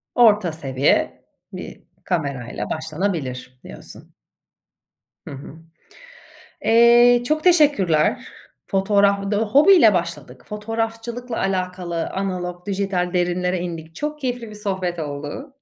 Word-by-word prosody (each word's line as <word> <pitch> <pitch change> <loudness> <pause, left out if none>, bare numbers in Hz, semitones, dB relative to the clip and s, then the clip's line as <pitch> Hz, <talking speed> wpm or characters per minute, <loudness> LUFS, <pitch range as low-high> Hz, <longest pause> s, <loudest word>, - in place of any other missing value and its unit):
Orta 210 -7 +4
seviye 135 -4 0 0.3
bir - - -9 0.2
kamerayla 140 -8 -3
başlanabilir 155 -6 -4
diyorsun. - - -12 1.1
Hı - - -7
hı. 135 +1 -10 1.1
Eee, 240 +1 +6
çok 310 0 0
teşekkürler. 285 - +3 0.4
Fotoğraf 200 0 +2
bu 200 - -4
da 205 - +1
hobiyle 270 - +6
başladık. 170 -7 -4
Fotoğrafçılıkla 225 +3 -4
alakalı 180 -3 -2
analog, 180 -2 -4
dijital 195 -2 -1
derinlere 180 0 0
indik. 165 -2 -7
Çok 300 0 -4
keyifli 245 -4 -4
bir 210 - -10
sohbet 190 -4 -3
oldu. 145 - -6
190 Hz, 105 wpm, -21 LUFS, 170-225 Hz, 1.1 s, Eee